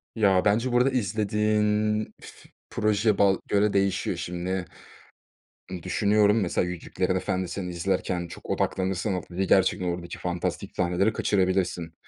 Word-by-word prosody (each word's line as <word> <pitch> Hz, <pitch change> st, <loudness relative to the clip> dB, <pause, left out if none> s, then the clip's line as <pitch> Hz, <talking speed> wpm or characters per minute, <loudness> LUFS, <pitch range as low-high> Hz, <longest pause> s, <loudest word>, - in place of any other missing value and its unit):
Ya, 95 Hz, -4 st, +3 dB
bence 115 Hz, +5 st, +2 dB
burada 125 Hz, +2 st, +4 dB
izlediğin 105 Hz, -1 st, +1 dB, 0.2 s
f -, -, -14 dB, 0.2 s
proje 105 Hz, 0 st, +1 dB
ba 95 Hz, -2 st, +4 dB
göre 105 Hz, +1 st, +2 dB
değişiyor. 100 Hz, -1 st, 0 dB
Şimdi, 90 Hz, +1 st, -3 dB, 1.1 s
ııı, 90 Hz, -3 st, -6 dB
düşünüyorum, 105 Hz, +1 st, +3 dB
mesela, 90 Hz, -1 st, 0 dB
Yüzüklerin 90 Hz, -2 st, -2 dB
Efendisi'ni 95 Hz, 0 st, -2 dB
izlerken 90 Hz, 0 st, -1 dB
çok 85 Hz, -, -11 dB
odaklanırsan, 95 Hz, +2 st, -1 dB
o 90 Hz, -, -2 dB
i 95 Hz, +1 st, 0 dB
gerçekten 95 Hz, -1 st, +3 dB
oradaki 85 Hz, 0 st, -4 dB
fantastik 90 Hz, -1 st, -3 dB
sahneleri 90 Hz, +4 st, +1 dB
kaçırabilirsin. 90 Hz, -5 st, 0 dB
95 Hz, 125 wpm, -26 LUFS, 90-105 Hz, 1.1 s, burada